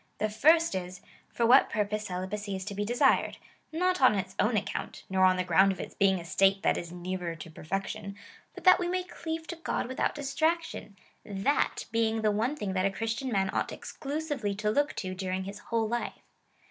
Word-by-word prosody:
The 215 - 0
first 325 +9 +4
is, 185 0 -5 0.3
for 235 - 0
what 250 +4 +6
purpose 210 0 -1
celibacy 195 +3 -4
is 190 0 -5
to 200 - -5
be 205 +1 -2
desired 245 +5 +2 0.2
— - - -40
not 365 +1 +1
on 255 -5 +6
its 195 -1 -3
own 215 +1 +3
account, - - -4
nor 190 0 +4
on 185 0 +4
the 185 - +1
ground 185 +3 +4
of 190 - -6
its - - -6
being 190 -2 +3
a 170 - -9
state 195 +2 +3
that - - +3
is 170 -1 -5
nearer 180 -1 -4
to 165 0 -10
perfection, 195 +4 -4 0.4
but - - -10
that 370 0 +7
we 355 - -1
may 365 +1 -1
cleave 325 -2 -5
to 345 - -6
God 330 - -2
without 260 - -1
distraction 305 - -1 0.2
— - - -40
tliat 205 +8 0
being 225 -1 +1
the 215 - +4
one 225 +8 0
thing 205 -10 -3
that 185 -1 +1
a - - +1
Chris 225 +3 -2
tian 260 +2 -4
man 195 -2 +1
ought - - -1
exclusively 285 -8 -4
to 210 +1 0
look 290 +6 +1
to 185 -2 -4
during 185 0 -3
his 200 +2 -7
whole 230 -1 +1
life. 240 +2 -3
210 Hz, 215 wpm, -29 LUFS, 190-270 Hz, 0.4 s, that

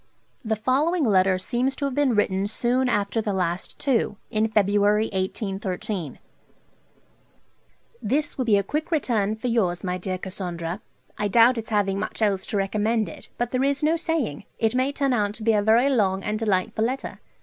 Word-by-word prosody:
The 220 -1 0
following 290 +10 +1
letter 190 -5 +3
seems 250 +7 -1
to 285 - -3
have 275 - -2
been 275 -3 +2
written 195 -1 +1
soon 250 +4 +1
after 210 0 0
the 210 -2 -2
last 180 -1 -2
two: 235 -6 0
in 215 +1 +1
February 210 0 +2
1813: 190 - -3 1.8
'This 280 +7 0
will 255 - -2
be 215 -3 +4
a 200 - +1
quick 300 +10 -3
return 230 - 0
for 220 - -10
yours, 195 -7 0
my 180 -1 -2
dear 185 +1 -3
Cassandra; 180 -1 -5 0.4
I 210 - +1
doubt 230 +3 +5
its 220 - -8
having 200 -2 +1
much 215 +1 -2
else 195 -3 +1
to 210 - -2
recommend 215 +3 0
it; - - -12
but 240 0 -2
there 255 0 +1
is 280 +1 +1
no 315 +2 +3
saying; 325 - -2
it 225 0 +1
may 255 +2 +1
turn 275 -2 0
out 210 -3 0
to 220 - -8
be 225 0 +3
a 210 - +3
very 225 +5 +4
long 195 -8 +1
and 215 0 -2
delightful 215 +1 0
letter. 260 +3 -4
215 Hz, 180 wpm, -24 LUFS, 195-250 Hz, 1.8 s, doubt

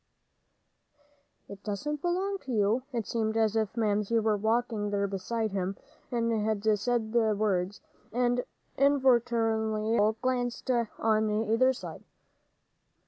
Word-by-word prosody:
"It 200 0 -11
doesn't 285 +9 -3
belong 380 +3 -1
to 265 - -8
you." 215 +2 +2
It 230 -4 -2
seemed 220 0 -1
as 220 -1 +2
if 220 0 -1
Mamsie 210 0 +1
was 215 -2 +1
walking 220 -1 0
there 200 0 0
beside 200 +3 -2
him, 190 0 -2 0.3
and 230 -1 0
had 215 -1 -1 0.2
said 230 0 -1
the 220 -3 +3
words, 200 -2 -1 0.3
and 245 +1 +1 0.4
involuntarily 230 -5 +2
Joel 210 +1 +4
glanced 255 0 -1
on 220 -2 +1
either 225 +4 +2
side. 260 - -8
220 Hz, 125 wpm, -29 LUFS, 210-245 Hz, 0.4 s, Joel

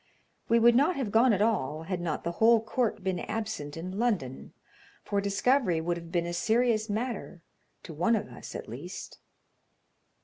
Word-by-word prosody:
We 230 - +5
would 235 +1 +6
not 290 +9 +3
have 255 -7 -2
gone 235 +4 +5
at 205 -1 +2
all 160 -9 0
had 180 +1 -3
not 165 -3 -2
the 170 - -1
whole 230 +1 +7
court 225 -1 -1
been 190 -2 -1
absent 215 -10 -4
in 185 +4 -5
London, 185 - -1 0.5
for 200 0 -1
discovery 200 -1 +2
would 170 +2 -1
have 170 -1 -9
been 170 -1 0
a 175 - -4
serious 225 +3 +1
matter 215 -5 -4 0.4
to 165 - -8
one 180 +10 +2
of 210 -1 -2
us - - -10
at - - -6
least. 145 - -8
200 Hz, 175 wpm, -29 LUFS, 170-230 Hz, 0.5 s, whole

